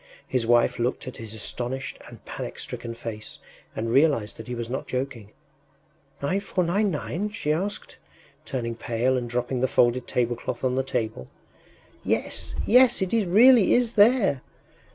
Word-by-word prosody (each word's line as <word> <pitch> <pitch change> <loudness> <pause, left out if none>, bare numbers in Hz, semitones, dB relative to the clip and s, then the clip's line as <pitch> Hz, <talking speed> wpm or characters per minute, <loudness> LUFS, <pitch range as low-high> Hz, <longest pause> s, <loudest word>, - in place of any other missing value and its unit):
His 125 -3 0
wife 120 -2 +3
looked 125 +2 -2
at 130 - -7
his 110 -1 -6
astonished 125 +4 -4
and - - -14
panic - - -6
stricken 115 -1 -6
face, 110 -2 -7 0.4
and 115 +1 -2
realized 135 -6 +2
that 110 - -9
he 125 - -4
was 120 -1 -4
not 130 +3 -4
joking. 125 -5 -4 0.9
“9,499?” 185 +2 -1
she 150 -8 -1
asked, 200 +6 -4 0.5
turning 115 -3 -3
pale 120 +3 0
and 120 -2 -2
dropping 125 +1 -2
the 130 - +3
folded 125 0 +2
tablecloth 120 0 -2
on 130 -1 +1
the 130 - +1
table. 110 - -3 0.8
“Yes, - - -1
yes... 250 -2 +5
it 190 - -3 0.2
really 230 +4 +6
is 240 -2 +1
there! 210 - +4
130 Hz, 145 wpm, -25 LUFS, 120-185 Hz, 0.9 s, really